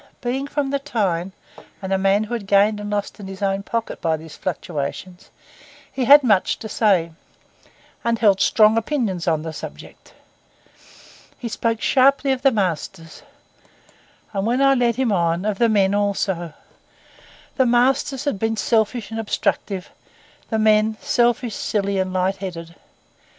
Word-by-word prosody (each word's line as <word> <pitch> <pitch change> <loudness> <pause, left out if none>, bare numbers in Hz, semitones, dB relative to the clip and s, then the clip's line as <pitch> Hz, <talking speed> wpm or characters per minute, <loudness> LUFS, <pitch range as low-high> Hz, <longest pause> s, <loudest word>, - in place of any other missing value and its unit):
Being 260 +3 -3
from 285 -1 -2
the 280 - 0
Tyne, 195 -10 -2 0.5
and 190 0 -3
a - - +3
man 195 +2 +2
who 215 +2 -6
had 220 -5 -4
gained 205 +1 +3
and 205 0 -6
lost 205 +1 -3
in 200 - -8
his 195 +1 -7
own 195 0 0
pocket 230 +3 -4
by 160 -1 0
these 160 0 -12
fluctuations, 175 +1 -5 0.6
he 260 - -2
had 285 +3 +8
much 210 -6 +2
to 220 - -7
say, 195 -6 +1 0.9
and 235 0 +1
held 205 -4 +3
strong 220 0 +4
opinions 220 - -2
on 160 -2 +1
the 160 -1 -6
subject. - - -11 1.2
He 245 - -6
spoke 230 0 -2
sharply 275 +1 +3
of 260 -1 -1
the 270 - +5
masters, 170 - -3 1.1
and, 195 +1 -1
when 245 +3 +1
I 275 0 +5
led 240 -3 +1
him 255 -2 0
on, 170 -1 0
of 210 -2 -2
the 235 - +4
men 200 -2 +2
also. 195 -5 -1 1.0
The 260 -2 +3
masters 260 +3 +1
had 285 -9 -2
been 225 +1 -1
selfish 225 0 0
and 225 - -4
obstructive, 200 -3 -2 0.6
the 220 - 0
men 215 0 +3
selfish, 240 -1 +1
silly, 200 -2 -1
and 185 0 -1
light 185 +1 0
headed. 170 -4 -7
210 Hz, 155 wpm, -21 LUFS, 190-240 Hz, 1.2 s, had